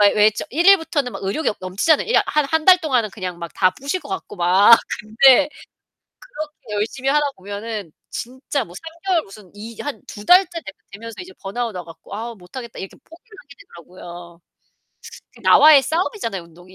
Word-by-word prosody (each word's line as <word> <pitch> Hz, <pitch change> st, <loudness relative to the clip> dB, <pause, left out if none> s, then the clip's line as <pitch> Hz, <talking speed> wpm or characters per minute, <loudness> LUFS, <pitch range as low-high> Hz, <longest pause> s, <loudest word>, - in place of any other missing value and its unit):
왜 210 Hz, 0 st, +6 dB
좀 215 Hz, -, -6 dB
1 340 Hz, +4 st, -1 dB
일부터는 325 Hz, -9 st, +3 dB
막 -, -, -8 dB
의욕이 200 Hz, +12 st, -1 dB
어 -, -, -4 dB
넘치잖아요. 195 Hz, -, +1 dB
이야 470 Hz, -, +4 dB
한 300 Hz, -2 st, +1 dB
1 320 Hz, +1 st, 0 dB
달 370 Hz, -1 st, +8 dB
동안은 250 Hz, -9 st, 0 dB
그냥 185 Hz, -4 st, -6 dB
막 170 Hz, -, -6 dB
다 185 Hz, -, +3 dB
부실 280 Hz, -, -4 dB
것 -, -, -12 dB
같고 380 Hz, -, -6 dB
막 190 Hz, +6 st, +6 dB, 0.2 s
근데 260 Hz, +6 st, +5 dB, 0.8 s
그렇게 300 Hz, -, -9 dB
열심히 230 Hz, +6 st, -2 dB
하다 295 Hz, +2 st, +3 dB
보면은 205 Hz, -2 st, -7 dB, 0.2 s
진짜 260 Hz, +3 st, -4 dB
뭐 175 Hz, -, -15 dB
3 185 Hz, -, -10 dB, 0.2 s
개월 355 Hz, -4 st, +2 dB
무슨 195 Hz, -4 st, -15 dB
이 220 Hz, +2 st, -10 dB
한 290 Hz, -1 st, -6 dB
2 205 Hz, -, -10 dB
달째 360 Hz, -2 st, +4 dB
되 195 Hz, -, -10 dB, 0.2 s
되면서 230 Hz, +3 st, -9 dB
이제 185 Hz, +1 st, -10 dB
번아웃 230 Hz, +3 st, -4 dB
와 180 Hz, -2 st, -6 dB
갖고 165 Hz, +3 st, -12 dB
'아 230 Hz, +2 st, -6 dB
못하겠다.' 230 Hz, +5 st, -10 dB
이렇게 190 Hz, -, -8 dB
포기를 415 Hz, +7 st, -17 dB
하게 280 Hz, -1 st, -16 dB
되더라고요. 175 Hz, 0 st, -13 dB, 0.9 s
그 -, -, -17 dB
나와의 295 Hz, -3 st, +7 dB
싸움이잖아요 320 Hz, -, -2 dB
운동이. 175 Hz, +2 st, -18 dB
230 Hz, 360 characters per minute, -20 LUFS, 190-300 Hz, 0.9 s, 달